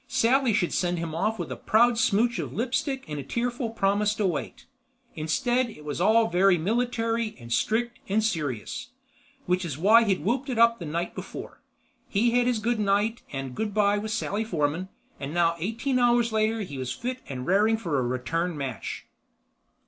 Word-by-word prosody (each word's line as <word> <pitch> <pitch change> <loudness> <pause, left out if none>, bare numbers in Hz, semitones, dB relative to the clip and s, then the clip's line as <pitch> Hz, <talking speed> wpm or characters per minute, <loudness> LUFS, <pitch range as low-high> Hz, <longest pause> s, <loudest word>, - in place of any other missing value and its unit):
Sally 255 +1 +3
should 205 -5 +1
send 175 0 0
him 165 -1 -4
off 215 +7 0
with - - -5
a - - -3
proud 235 +2 +3
smooch 230 +1 +2
of - - -4
lipstick 265 +3 -1
and 150 -1 -4
a - - -5
tearful 240 - -2
promise 205 -1 +1
to 210 - 0
wait. 175 -6 -3 0.5
Instead 240 +11 0
it 150 -9 -12
was 150 +3 -3
all 220 +4 +4
very 180 +1 +4
military 230 +3 -1
and 120 -1 -5
strict 235 - 0
and 215 +3 +2
serious—which 220 - -4
is 155 -6 -4
why 215 +8 +6
he'd 195 -5 0
whooped 260 +6 0
it 250 - -2
up 235 0 +5
the 170 - -6
night 170 +3 -3
before. - - -8 0.5
He'd 230 +4 +2
had 245 0 +3
his 250 -2 +2
good 230 +1 0
night 205 +3 +1
and 135 -2 -5
good 210 +8 -3
by 205 -1 +3
with 215 +1 -5
Sally 220 -1 -1
Forman, 170 -2 -1 0.3
but 140 - -4
now 170 +1 +2
eighteen 235 - -1
hours 240 -1 +3
later 220 +1 +1
he 145 -9 -6
was 130 -1 -3
fit 255 - -4
and 130 -2 -5
raring 210 +4 +3
for 165 -10 -1
a - - +1
return 130 +8 -2
match. 135 -6 -5
215 Hz, 185 wpm, -26 LUFS, 170-235 Hz, 0.5 s, why